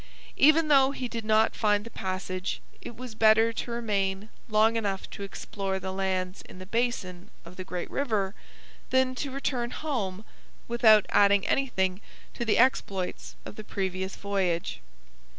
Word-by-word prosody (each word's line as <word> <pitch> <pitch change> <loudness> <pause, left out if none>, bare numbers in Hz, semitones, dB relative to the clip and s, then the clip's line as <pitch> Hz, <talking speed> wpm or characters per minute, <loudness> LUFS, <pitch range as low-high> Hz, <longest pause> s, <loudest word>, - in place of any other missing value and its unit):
Even 310 +2 +5
though 270 -3 +5
he 255 -2 -4
did 230 -1 -5
not 215 +1 +3
find 210 -1 +1
the 230 - -9
passage, 185 -1 -4 0.2
it 235 - -8
was 250 0 -8
better 220 +1 +4
to 235 - -5
remain 205 -3 -1 0.2
long 220 +1 +4
enough 200 -4 -2
to - - -8
explore 195 -1 -4
the 190 0 -5
lands 190 -1 -2
in - - -11
the 185 - -9
basin 195 -5 -2 0.2
of 170 +2 -12
the 185 - -6
great 180 -1 -5
river 215 -8 -1 0.6
than 260 0 +2
to 275 +2 -4
return 260 -3 -2
home 220 -10 -3 0.4
without 220 -3 +5
adding 200 -1 +4
anything 190 -8 0 0.3
to - - -4
the 225 -2 +2
exploits 200 -7 0
of - - -9
the 215 - -7
previous 190 -2 -3
voyage. 190 -4 -2
210 Hz, 155 wpm, -28 LUFS, 190-235 Hz, 0.6 s, Even